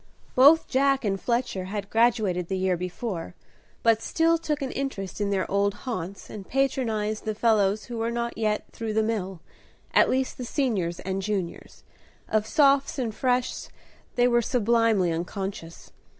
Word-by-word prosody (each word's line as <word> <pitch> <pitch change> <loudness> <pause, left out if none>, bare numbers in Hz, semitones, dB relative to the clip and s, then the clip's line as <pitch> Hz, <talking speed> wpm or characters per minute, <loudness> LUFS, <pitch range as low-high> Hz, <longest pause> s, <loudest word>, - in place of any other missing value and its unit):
Both 290 +6 +6
Jack 275 -1 +2
and 195 -2 -1
Fletcher 235 -6 -1
had 200 +1 -5
graduated 220 -7 +2
the 190 - -2
year 185 -1 +1
before, 180 0 -5 0.5
but 225 -1 +4
still 330 +6 +2
took 300 -3 -2
an 265 - -3
interest 210 -9 -4
in 205 - 0
their 190 -3 0
old 200 0 +1
haunts, 195 -6 -5
and 200 -3 -9
patronized 225 -6 0
the 215 -1 -3
fellows 210 -2 +2
who 235 -2 -6
were 225 +1 0
not 235 0 -3
yet 215 -1 0
through 225 -1 -4
the 220 0 +2
mill, 195 -6 -3 0.5
at - - +5
least 260 0 -1
the - - -3
Seniors 220 - -1
and 190 0 -3
Juniors; 190 -4 -4 0.4
of 215 0 0
Sophs 280 -1 +3
and 240 -5 -2
Freshs 250 +1 -1 0.5
they 245 0 +4
were 240 -1 +3
sublimely 230 -5 +2
unconscious. 175 0 -5
220 Hz, 160 wpm, -26 LUFS, 195-245 Hz, 0.5 s, Both